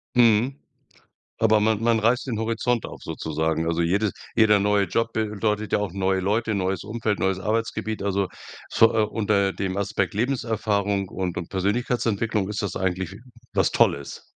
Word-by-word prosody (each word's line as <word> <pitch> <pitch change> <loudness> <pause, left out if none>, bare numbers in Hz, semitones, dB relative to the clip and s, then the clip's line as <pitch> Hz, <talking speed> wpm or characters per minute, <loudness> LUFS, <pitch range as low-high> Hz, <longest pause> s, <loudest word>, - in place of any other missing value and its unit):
Mhm. 120 +3 +4 0.8
Aber 110 -1 +4
man 110 0 +1
man 115 -1 +3
reißt 120 +5 +2
den 115 -4 -2
Horizont 115 +1 0
auf - - -11
sozusagen. 80 +1 -2
Also 85 0 +1
jede 100 +5 +1 0.2
jeder 105 -2 +5
neue 100 0 +2
Job 115 +5 -1
bedeutet 105 0 -1
ja - - +4
auch 100 -4 -3
neue 95 0 0
Leute, 110 +3 0
neues 95 -2 -1
Umfeld, 110 -1 -2
neues 95 -1 0
Arbeitsgebiet. 110 +1 -2
Also 100 -1 0 0.4
so, 115 - +6
äh, 110 - +3
unter 105 -2 +1
dem 95 -1 -3
Aspekt 100 +1 -1
Lebenserfahrung 105 -5 0
und 90 -2 -3
und 85 - -5
Persönlichkeitsentwicklung 105 0 0
ist 105 0 -3
das 100 -3 -3
eigentlich 95 0 -2 0.4
was - - +2
Tolles. 70 -1 +1
105 Hz, 160 wpm, -24 LUFS, 95-110 Hz, 0.8 s, so